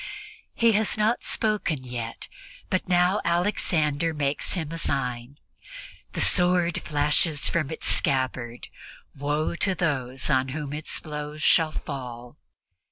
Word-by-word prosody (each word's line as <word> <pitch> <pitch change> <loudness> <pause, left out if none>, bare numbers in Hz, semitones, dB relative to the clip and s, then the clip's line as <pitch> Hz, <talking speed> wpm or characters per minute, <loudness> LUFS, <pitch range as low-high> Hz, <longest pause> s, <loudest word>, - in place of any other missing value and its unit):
He 230 -1 +4
has 215 0 +1
not 215 +3 +1
spoken 210 - 0
yet, 120 -2 -6 0.4
but 185 0 -1
now 180 +3 +3
Alexander 165 -3 0
makes 145 -1 0
him 160 -4 -3
a 165 - -4
sign. 125 -3 -2 0.8
The - - -1
sword 180 -1 +3
flashes 150 0 +2
from 155 -5 0
its 160 - -4
scabbard; 130 -3 +1 0.5
woe 145 +3 -1
to 190 +1 +1
those 135 -7 -1
on 130 -3 +2
whom 145 -2 -5
its 155 +1 -1
blows 150 0 -6
shall 160 -2 +4
fall! 125 -5 -7
150 Hz, 125 wpm, -25 LUFS, 135-175 Hz, 0.8 s, He